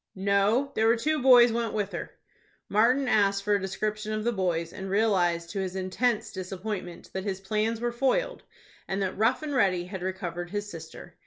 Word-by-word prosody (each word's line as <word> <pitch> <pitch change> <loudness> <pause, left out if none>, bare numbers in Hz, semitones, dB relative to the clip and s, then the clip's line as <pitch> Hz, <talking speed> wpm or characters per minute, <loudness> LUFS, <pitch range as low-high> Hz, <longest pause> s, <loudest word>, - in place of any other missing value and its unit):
"No; 200 +7 +2
there 220 -3 +2
were 230 - +5
two 305 +5 0
boys 245 -2 +7
went 230 -1 -1
with 205 -2 -1
her." - - -5 0.6
Martin 245 +6 +3
asked 200 -3 +2
for 210 +1 +1
a 200 - +2
description 215 +3 -3
of 215 0 -2
the 240 - +1
boys, 175 -5 -1
and 190 -1 -6
realized 180 -5 +1
to 200 - -3
his 190 -1 -3
intense 215 +5 -1
disappointment 185 -1 -6
that 190 - -3
his 195 -2 -3
plans 215 +3 -1
were 240 +1 -1
foiled, 275 - 0 0.5
and 190 - -2
that 190 - -2
Rough 230 +8 +1
and 295 -2 -3
Ready 185 -8 +2
had 190 0 -7
recovered 175 -2 -4
his 205 +2 -3
sister. 165 -4 -10
205 Hz, 190 wpm, -27 LUFS, 190-230 Hz, 0.6 s, boys